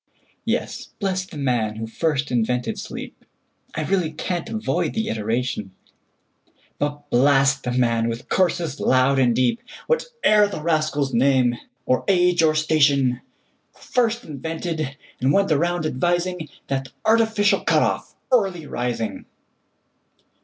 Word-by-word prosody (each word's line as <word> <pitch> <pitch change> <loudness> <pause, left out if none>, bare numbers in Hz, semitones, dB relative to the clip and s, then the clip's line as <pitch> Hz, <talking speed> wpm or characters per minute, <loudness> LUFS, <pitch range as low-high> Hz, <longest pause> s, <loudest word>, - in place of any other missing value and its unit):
Yes; - - -2
bless 190 -2 -1
the 160 - -10
man 120 -6 0
who 110 +1 -4
first 145 +3 -1
invented 125 +1 0
sleep(I - - -9
really 180 -3 +1
can't 170 +2 -3
avoid 220 -1 -1
the 220 0 -1
iteration),But 120 +6 -6
blast 135 +1 +4
the 125 - -3
man, 115 -2 +1
with 115 +1 -5
curses 175 -5 0
loud 130 +1 +3
and 120 -3 +3
deep, 130 - +1 0.2
Whate'er 470 - +2
the 175 -6 -6
rascal's 155 -4 0
name, 125 0 +3 0.3
or 130 - +1
age, 180 -3 +3
or 155 -1 +3
station, 140 -5 +3 0.5
Who - - -23
first 235 -1 0
invented, 155 - -4 0.2
and 130 +3 +2
went 195 +1 +2
round 170 +2 +1
advising, 175 +3 -1 0.2
That 135 -1 -2 0.2
artificial 220 -2 +3
cut - - +2
off, - - -2 0.2
Early 195 -10 +2
Rising! 120 -4 -3
150 Hz, 125 wpm, -22 LUFS, 125-180 Hz, 0.5 s, blast